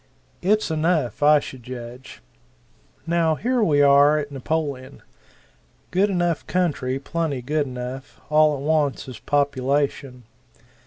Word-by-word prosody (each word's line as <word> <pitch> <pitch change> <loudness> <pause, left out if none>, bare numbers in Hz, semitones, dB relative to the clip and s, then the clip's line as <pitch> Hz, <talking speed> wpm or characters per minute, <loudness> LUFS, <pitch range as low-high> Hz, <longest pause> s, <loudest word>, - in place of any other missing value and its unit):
It's 210 -1 +1
enough, 155 - 0
I 150 +1 +6
should 130 -3 -9
judge. 125 +1 -10 0.8
Now 165 -1 +1
here 245 - 0
we 145 -8 +3
are 140 +2 +5
at 145 -1 -4
Napoleon. 140 -1 -4 0.9
Good 195 +3 +2
enough 175 -4 -1
country 145 -8 -1
plenty 145 -2 -3
good 150 +2 -1
enough 125 +1 -7
all 155 -1 +4
it - - -8
wants 150 -2 0
is 130 - -9
population. 140 -2 -1
145 Hz, 120 wpm, -23 LUFS, 130-160 Hz, 0.9 s, I